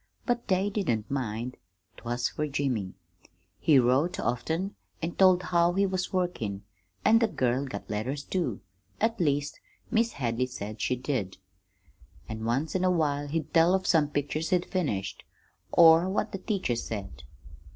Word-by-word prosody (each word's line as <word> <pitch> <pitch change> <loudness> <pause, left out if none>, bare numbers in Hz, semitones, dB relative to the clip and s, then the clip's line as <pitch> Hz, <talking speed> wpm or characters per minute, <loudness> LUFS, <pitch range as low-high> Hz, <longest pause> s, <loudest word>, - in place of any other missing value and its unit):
But 240 -1 -1
they 190 +2 +1
didn't 120 - -1
mind 125 -2 -3 0.4
't - - -16
was 120 +1 0
fer 150 - -3
Jimmy. 130 -9 -2 0.6
He 150 -4 +5
wrote 130 +8 +2
often, 160 - -1 0.3
an' 165 +1 -2
told 185 -1 +5
how 170 0 +2
he 200 +2 +2
was 185 -1 -2
workin', 115 - -2 0.4
an' 225 - +6
the 230 - +3
girl 130 - 0
got 100 -5 -7
letters, 125 +7 -3
too; 155 - -2 0.4
at 225 +1 +1
least, 145 -3 0 0.3
Mis' 230 0 +2
Hadley 125 -1 -1
said 110 -4 -7
she 125 - +1
did. 125 -8 -3 0.9
An' 110 0 -5
once 135 +7 0
in 185 - 0
a 185 - +4
while 145 -4 +1
he'd 155 0 -3
tell 170 +2 +5
of 190 -1 -2
some 155 -4 +3
picture 145 +1 -2
he'd 175 +2 0
finished, 105 - -2 0.5
or 165 +2 +7
what 205 +2 -1
the 195 - -4
teacher 190 - -1
said. 100 - -5
145 Hz, 160 wpm, -28 LUFS, 120-185 Hz, 0.9 s, or